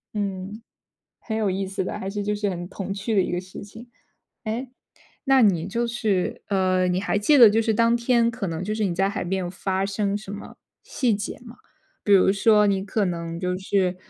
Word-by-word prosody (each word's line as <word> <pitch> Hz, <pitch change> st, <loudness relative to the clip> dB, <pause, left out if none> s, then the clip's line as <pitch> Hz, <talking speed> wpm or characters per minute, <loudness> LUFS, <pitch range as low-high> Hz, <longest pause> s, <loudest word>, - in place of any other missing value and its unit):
嗯， 200 Hz, +1 st, -4 dB, 0.6 s
很 220 Hz, -1 st, -4 dB
有 210 Hz, -3 st, +1 dB
意 190 Hz, +1 st, -2 dB
思 190 Hz, 0 st, -3 dB
的， -, -, -5 dB
还 190 Hz, -, -4 dB
是 205 Hz, +1 st, -3 dB
就 210 Hz, +1 st, -1 dB
是 205 Hz, -1 st, -1 dB
很 175 Hz, -1 st, -5 dB
童 195 Hz, 0 st, -5 dB
趣 205 Hz, +3 st, -3 dB
的 195 Hz, -, +5 dB
一 -, -, -2 dB
个 175 Hz, -, -1 dB
事 185 Hz, +1 st, -10 dB
情。 225 Hz, +4 st, -12 dB, 0.6 s
诶， 235 Hz, +4 st, -3 dB, 0.6 s
那 270 Hz, -2 st, +4 dB
你 180 Hz, -6 st, +3 dB
就 235 Hz, +4 st, -1 dB
是 220 Hz, -6 st, -1 dB
呃， 185 Hz, -2 st, +2 dB
你 180 Hz, +1 st, 0 dB
还 200 Hz, 0 st, 0 dB
记 290 Hz, +9 st, +4 dB
得 235 Hz, -5 st, +9 dB
就 220 Hz, +2 st, +2 dB
是 225 Hz, -1 st, +1 dB
当 230 Hz, +1 st, +3 dB
天 235 Hz, -1 st, +2 dB
可 230 Hz, -3 st, -4 dB
能 165 Hz, 0 st, -4 dB
就 210 Hz, +3 st, -2 dB
是 215 Hz, -, -1 dB
你 185 Hz, -3 st, -1 dB
在 195 Hz, +3 st, +1 dB
海 200 Hz, -2 st, -4 dB
边 190 Hz, +2 st, -1 dB
有 175 Hz, -1 st, -4 dB
发 190 Hz, +1 st, -2 dB
生 200 Hz, 0 st, -1 dB
什 205 Hz, -1 st, -8 dB
么 205 Hz, -, -9 dB, 0.3 s
细 245 Hz, -5 st, 0 dB
节 205 Hz, 0 st, -5 dB
吗？ 235 Hz, 0 st, -12 dB, 0.5 s
比 205 Hz, -, +2 dB
如 190 Hz, 0 st, +6 dB
说 210 Hz, +1 st, +4 dB
你 195 Hz, -1 st, 0 dB
可 210 Hz, 0 st, 0 dB
能 170 Hz, -1 st, -4 dB
就 180 Hz, 0 st, -2 dB
是 190 Hz, -1 st, 0 dB
200 Hz, 240 characters per minute, -24 LUFS, 185-220 Hz, 0.6 s, 得